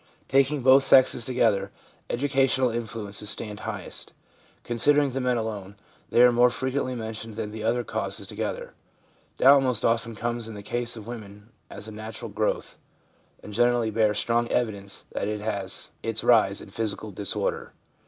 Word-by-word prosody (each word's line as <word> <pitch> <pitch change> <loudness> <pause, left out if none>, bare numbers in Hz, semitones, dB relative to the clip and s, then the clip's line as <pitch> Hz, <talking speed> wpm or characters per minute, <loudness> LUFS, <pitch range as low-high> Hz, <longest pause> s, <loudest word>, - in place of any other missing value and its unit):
Taking 135 0 +2
both 135 +1 +7
sexes 130 -3 +5
together, 110 -6 +1 0.4
educational 130 -1 +2
influences 110 -3 -4
stand 105 -2 -2
highest; - - -6 0.5
considering 145 +4 +2
the 135 +1 -2
men 125 -1 +1
alone, 105 -3 -5 0.3
they 120 - +5
are 125 - +7
more 120 +1 +5
frequently 130 +2 -2
mentioned 110 -1 -6
than 105 -1 -4
the 110 0 -6
other 120 +2 +1
causes - - -4
to - - -10
gether. - - -4 0.6
Doubt 140 +1 +7
most 125 -4 0
often 115 0 +1
comes 120 +1 -3
in 110 - -8
the 100 - -8
case 120 +2 -2
of 110 - -9
women 105 -2 -9 0.2
as 105 +2 -8
a - - -7
natural 110 +1 -7
growth, - - -2 0.6
and 105 - -9
generally 120 0 +2
bears 105 -1 +2
strong 120 +1 +1
evi 120 -2 +1
dence 100 -1 -8
that - - -2
it 105 0 -2
has 100 -3 -3
its 115 0 -2
rise 105 -5 +4
in - - -12
physical 110 -1 -2
disorder. 100 +1 -2
115 Hz, 165 wpm, -26 LUFS, 105-125 Hz, 0.6 s, both